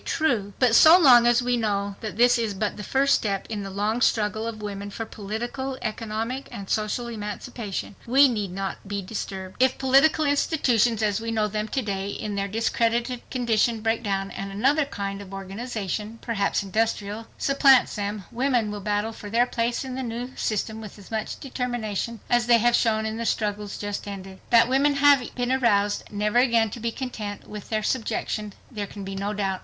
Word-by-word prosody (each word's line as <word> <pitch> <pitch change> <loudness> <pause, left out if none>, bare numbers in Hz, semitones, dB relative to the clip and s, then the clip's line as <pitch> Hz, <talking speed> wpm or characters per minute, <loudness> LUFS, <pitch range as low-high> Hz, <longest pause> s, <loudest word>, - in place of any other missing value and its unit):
True! 230 -11 0
But 250 -3 +3
so 315 +8 +9
long 245 -8 +7
as 240 0 +4
we 245 0 +1
know 200 -3 -1
that 215 -2 -5
this 245 +1 +5
is 220 -3 -1
but 205 +1 -2
the - - -7
first 275 +6 +2
step 200 -3 0
in 215 -2 -3
the 195 - -5
long 210 +5 -1
struggle 220 -1 +1
of 225 -1 -5
women 200 -1 -5
for 225 +3 -5
political, 240 +6 -5
economic 225 +4 -3
and 200 -1 -7
social 215 +4 -1
emancipation, 210 -1 -5
we 270 +4 +6
need 210 -6 -2
not 195 +1 -5
be 200 0 -3
disturbed. 190 0 -6
If 260 0 +3
political 275 +4 +4
institutions 245 -6 +2
as 210 0 +1
we 230 - -4
know 220 -2 +1
them 210 +1 -3
to 260 +4 -2
day 195 -2 -3
in 210 +1 -4
their 200 0 -1
discredited 230 +3 0
condition 235 -2 +1
break 225 +1 0
down, 195 -3 -2
and 195 0 -6
another 270 +9 +2
kind 200 -6 -5
of 195 -1 -9
organization—perhaps 210 +1 -3
industrial—supplants 225 +6 +2
them, 205 -1 -3
women 245 -3 +1
will 205 -1 -5
battle 210 +2 -1
for 210 -1 -9
their 235 +3 +3
place 240 +1 -1
in 260 - -5
the 260 - -3
new 245 +1 -5
system 220 +1 -2
with 215 -1 -10
as 200 0 -14
much 220 -1 -3
determination 240 -4 -3
as 240 0 +2
they 240 -1 +7
have 240 +1 +3
shown 220 -2 +2
in 220 0 -3
the 230 - -3
struggle 210 -1 -1
just 205 0 -5
ended. 195 -1 -8
That 235 -1 +6
women 280 +3 +3
have 280 -3 +4
been 245 0 -1
aroused 210 -6 +2
never 210 +3 +1
again 230 -4 +3
to 235 - -7
be 230 +1 -2
content 220 -5 -6
with 210 -1 -9
their 215 -1 -1
subjection 215 -3 -2 0.2
there 210 -4 -4
can 200 0 -9
be 195 0 -6
no 200 +1 -2
doubt. 195 -2 -1
220 Hz, 190 wpm, -25 LUFS, 205-245 Hz, 0.2 s, so